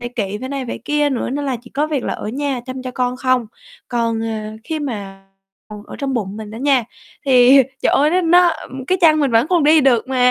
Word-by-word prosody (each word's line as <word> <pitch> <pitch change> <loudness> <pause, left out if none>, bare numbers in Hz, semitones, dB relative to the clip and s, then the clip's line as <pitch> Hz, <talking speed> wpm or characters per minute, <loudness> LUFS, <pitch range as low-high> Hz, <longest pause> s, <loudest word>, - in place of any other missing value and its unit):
phải 240 - -5
kỵ, 205 -2 -2
phải 260 - -5
này, 275 -1 -4
phải - - -5
kia 295 0 +1
nữa 255 -3 -2
nên 285 +2 -3
là 265 -3 -1
chỉ 245 - -15
có 295 +3 -1
việc 295 -5 -2
là - - -2
ở - - -6
nhà 270 +2 -2
chăm 255 0 -6
cho 255 - -5
con 250 0 -2
không. 255 -2 0 0.4
Còn, 230 -2 -1
à, 215 -1 -4
khi 320 +3 -3
mà 200 -8 -6 0.4
còn 210 -1 -9
ở - - -9
trong 275 -1 -2
bụng 205 -3 -3
mình 215 -1 -8
đó 220 - -9
nha, 265 -3 +2 0.4
thì 260 +1 +6 0.2
trời - - +2
ơi, 295 +2 +3
nó 365 +2 +2
nó 350 0 +4 0.3
cái 370 - +1
chân 310 -3 +5
mình 280 -3 +1
vẫn 230 +3 +3
còn 345 -5 +2
đi 310 +1 +6
được 260 -3 +2
mà 250 -1 +3
255 Hz, 250 wpm, -18 LUFS, 230-290 Hz, 0.4 s, thì